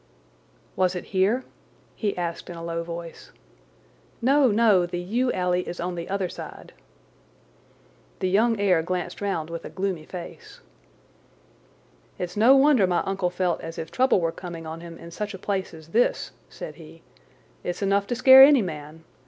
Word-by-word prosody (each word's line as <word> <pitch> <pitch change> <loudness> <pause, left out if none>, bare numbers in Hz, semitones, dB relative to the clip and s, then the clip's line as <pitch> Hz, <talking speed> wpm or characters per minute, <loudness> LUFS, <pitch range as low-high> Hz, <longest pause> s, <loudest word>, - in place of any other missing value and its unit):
"Was 185 0 +1
it 180 - -4
here?" 200 +7 +2 0.5
he 205 -4 -2
asked 170 -1 -4
in 175 - -7
a 165 - -8
low 170 0 -3
voice. 170 0 -8 0.9
"No, 275 +3 +4
no, 210 -5 +4
the 175 - -4
yew 235 +9 0
alley 180 0 0
is 175 - -6
on 180 +1 -3
the 170 +1 -6
other 195 -1 -1
side." - - -10 1.4
The 185 - -1
young 220 +4 +2
heir 185 -5 +3
glanced 180 +3 -4
round 165 -6 -2
with 170 - -6
a - - -7
gloomy 185 -5 -3
face. 175 -2 -9 1.6
"It's 180 0 -5
no 230 +6 +6
wonder 270 -7 +5
my 175 -1 +1
uncle 195 -2 -1
felt 180 -1 -1
as 165 0 -8
if 160 - -6
trouble 260 -5 +3
were 165 -2 0
coming 170 -2 -8
on 160 +1 -7
him 170 -1 -10
in 170 - -11
such 205 +3 -5
a - - -7
place 190 0 -3
as 160 -1 -13
this," 235 +8 +1 0.2
said - - -9
he. - - -14 0.6
"It's 175 +3 -3
enough 200 0 +1
to 245 - -1
scare 260 +2 +9
any 275 -3 +8
man. 155 -2 -7
185 Hz, 170 wpm, -25 LUFS, 170-210 Hz, 1.6 s, scare